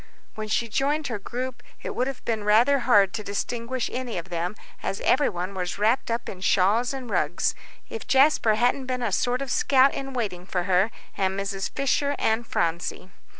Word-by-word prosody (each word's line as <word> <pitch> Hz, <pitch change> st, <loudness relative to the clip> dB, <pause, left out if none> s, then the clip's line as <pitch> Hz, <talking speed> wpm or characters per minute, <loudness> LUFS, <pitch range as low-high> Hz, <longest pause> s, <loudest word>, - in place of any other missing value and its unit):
When 215 Hz, -1 st, -5 dB
she 230 Hz, +2 st, 0 dB
joined 285 Hz, +7 st, 0 dB
her 230 Hz, -4 st, -3 dB
group 250 Hz, +4 st, -5 dB, 0.2 s
it -, -, -4 dB
would 250 Hz, +2 st, 0 dB
have 270 Hz, -2 st, -6 dB
been 220 Hz, -2 st, -1 dB
rather 235 Hz, +7 st, +4 dB
hard 205 Hz, -7 st, +4 dB
to 215 Hz, -, -4 dB
distinguish 230 Hz, +5 st, -3 dB
any 245 Hz, -4 st, -3 dB
of 170 Hz, +2 st, -6 dB
them, 175 Hz, +3 st, -2 dB, 0.3 s
as 195 Hz, -, -3 dB
everybody 195 Hz, -10 st, +1 dB
was 185 Hz, -2 st, -4 dB
wrapped 220 Hz, +6 st, +2 dB
up 230 Hz, +1 st, -2 dB
in 185 Hz, -, -7 dB
shawls 200 Hz, +6 st, +3 dB
and 265 Hz, -2 st, -6 dB
rugs, 175 Hz, -6 st, 0 dB, 0.3 s
if 455 Hz, -, -7 dB
Jasper 265 Hz, -5 st, +4 dB
hadn't 245 Hz, +3 st, +1 dB
been 250 Hz, -1 st, -2 dB
a 225 Hz, -, 0 dB
sort 250 Hz, +7 st, 0 dB
of 270 Hz, -, -5 dB
scout 270 Hz, 0 st, +4 dB
in 270 Hz, 0 st, -5 dB
waiting 190 Hz, -7 st, -3 dB
for 180 Hz, -2 st, -1 dB
her 185 Hz, +3 st, +3 dB, 0.3 s
and 190 Hz, 0 st, 0 dB
Mrs. 195 Hz, -1 st, -3 dB
Fisher 280 Hz, +1 st, 0 dB
and 225 Hz, +1 st, 0 dB
Phronsie. 170 Hz, +2 st, -2 dB
230 Hz, 190 wpm, -25 LUFS, 195-255 Hz, 0.3 s, rather